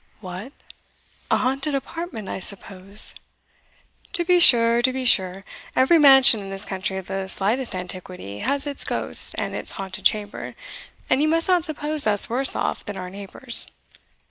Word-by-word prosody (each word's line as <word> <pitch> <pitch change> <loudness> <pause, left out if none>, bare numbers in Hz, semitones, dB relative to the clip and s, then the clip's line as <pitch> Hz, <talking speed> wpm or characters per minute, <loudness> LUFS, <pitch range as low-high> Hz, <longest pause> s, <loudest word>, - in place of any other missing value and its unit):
"What! 190 +6 -9 0.8
a - - +2
haunted 275 +3 -2
apartment, 275 - -6
I - - -5
suppose?" 195 +1 -5 1.0
"To 350 -4 -1
be 360 0 +3
sure, 235 -6 +7
to 260 +2 +2
be 260 0 -5
sure 190 -4 +1 0.3
every 295 +6 +4
mansion 270 -5 +7
in 195 -1 -9
this 195 +1 -6
country 190 0 -4
of 190 - -7
the 195 0 -5
slightest 215 +5 0
antiquity 180 - -6
has 280 +1 -2
its 285 -1 -1
ghosts - - +4
and - - -4
its - - -5
haunted 195 0 -8
chamber, 205 -1 -1 0.5
and 260 - +1
you 305 - +2
must 330 +1 +1
not 360 -3 +1
suppose 305 -3 -2
us 205 -1 +3
worse 265 +3 +3
off - - -3
than 205 -1 -8
our 180 -1 -8
neighbours. 200 +5 -2
230 Hz, 165 wpm, -22 LUFS, 195-275 Hz, 1.0 s, sure